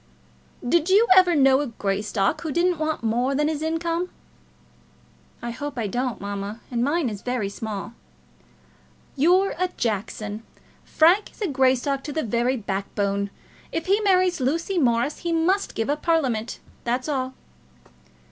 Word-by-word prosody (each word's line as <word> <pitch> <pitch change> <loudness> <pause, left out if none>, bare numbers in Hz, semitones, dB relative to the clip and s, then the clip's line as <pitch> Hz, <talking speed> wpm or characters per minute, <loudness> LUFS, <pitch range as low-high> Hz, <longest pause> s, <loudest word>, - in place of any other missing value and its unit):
"Did 335 +6 +2
you 420 +5 +5
ever 365 -2 +6
know 270 -1 +5
a 290 - -2
Greystock 205 -2 -1
who 320 - -3
didn't 345 +1 +1
want 310 -4 -2
more 245 +4 +1
than 295 +2 +2
his 310 -1 -2
income?" 330 +2 -1 1.3
"I 235 - -3
hope 285 +3 -6
I 230 - -1
don't, 245 +2 -2
mamma, 200 +2 -5
and 240 -1 0
mine 295 +2 +1
is 210 -3 -5
very 245 -5 -2
small." 215 +2 -6 1.2
"You're 360 +7 +3
a 365 - +2
Jackson. 215 -1 -3 0.4
Frank 350 +6 +3
is - - -2
Greystock 265 +1 +2
to 295 - -4
the 315 +2 -1
very 240 +3 0
backbone. 200 -1 -2 0.4
If 330 - -3
he 395 +3 +3
marries 370 -4 +3
Lucy 335 +8 0
Morris 245 +1 +1
he 345 - -3
must 350 +5 +1
give 225 - -1
up 295 +1 -1
Parliament. 260 -10 0 0.3
That's 245 +3 -1
all." 260 -3 -2
265 Hz, 145 wpm, -24 LUFS, 225-330 Hz, 1.3 s, ever